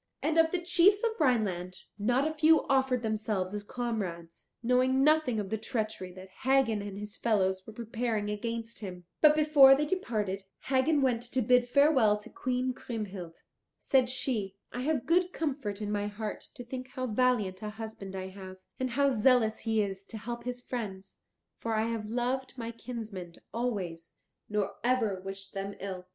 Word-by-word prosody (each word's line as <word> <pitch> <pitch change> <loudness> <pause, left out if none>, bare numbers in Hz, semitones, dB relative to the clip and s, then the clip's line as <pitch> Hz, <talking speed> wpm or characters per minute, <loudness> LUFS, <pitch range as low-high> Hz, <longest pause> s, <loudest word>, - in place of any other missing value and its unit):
And 320 +1 +2
of 325 0 +5
the 360 - 0
chiefs 375 +4 +4
of 465 - +3
Rhineland 195 - 0 0.2
not 245 +7 +2
a 315 - -2
few 315 +1 +5
offered 265 -2 +2
themselves 215 -3 -1
as 210 - -3
comrades, 205 -8 -4
knowing 255 +2 +3
nothing 300 -6 +4
of 200 -1 -4
the 220 - -1
treachery 220 -5 -3
that 185 +1 -11
Hagen 260 -5 +3
and 200 -1 -6
his 210 +1 -7
fellows 190 -4 +1
were 220 - -9
preparing 225 -1 -2
against 230 +2 -4
him. 180 -4 -7 0.2
But 300 -1 +7
before 295 -3 +8
they 295 +2 0
departed 215 - -1 0.2
Hagen 275 +2 +2
went 245 -3 +2
to 260 - +1
bid 245 +1 +4
farewell 265 -6 +5
to 210 - -12
Queen 255 0 -1
Kriemhild. 200 -9 -6 0.4
Said 260 -2 +2
she, 225 -6 -1 0.2
"I 245 - -4
have 290 -1 0
good 355 +2 +2
comfort 260 -10 -3
in 205 - -2
my 205 0 0
heart 210 +1 -5
to 245 - -7
think 255 +1 -6
how 255 0 -4
valiant 215 -5 +1
a 215 - -4
husband 215 -3 -7
I 190 0 -4
have, 190 -1 -10 0.2
and 260 0 0
how 280 +3 +3
zealous 235 -2 +3
he 220 -2 +1
is 195 -1 -5
to 220 - -8
help 235 +2 -6
his 245 0 -4
friends, 195 -7 -6 0.4
for 225 -1 -1
I 220 +1 +2
have 215 -2 -4
loved 255 +3 -2
my 230 -1 -4
kinsmen 220 -7 -7 0.2
always, 190 -9 -3 0.3
nor 210 -1 -1
ever 230 -6 +1
wished 195 0 -8
them 195 0 -4
ill." 185 -2 -6
230 Hz, 175 wpm, -30 LUFS, 205-260 Hz, 0.4 s, before